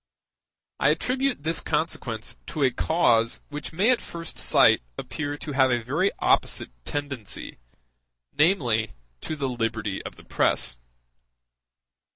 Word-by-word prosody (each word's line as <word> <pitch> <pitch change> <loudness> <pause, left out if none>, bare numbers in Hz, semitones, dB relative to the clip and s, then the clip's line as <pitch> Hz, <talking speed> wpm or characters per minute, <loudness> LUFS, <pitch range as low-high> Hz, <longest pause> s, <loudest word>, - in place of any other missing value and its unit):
I - - +4
attribute 260 - 0
this 165 +1 +1
consequence 140 -8 -2
to 155 - -2
a 130 - +4
cause 120 -5 +2
which 150 0 -6
may 195 +9 +3
at 250 - +2
first 165 -1 -7
sight - - +5 0.2
appear 145 -1 -4
to 150 - -6
have 130 -1 +4
a 120 -2 +1
very 155 - +1
opposite - - +1
tendency, 140 - -4 0.7
namely, 125 - +2 0.3
to 155 - -4
the 140 -3 -2
liberty 115 -5 -2
of - - -8
the - - -15
press. - - +1
145 Hz, 130 wpm, -25 LUFS, 115-160 Hz, 0.7 s, sight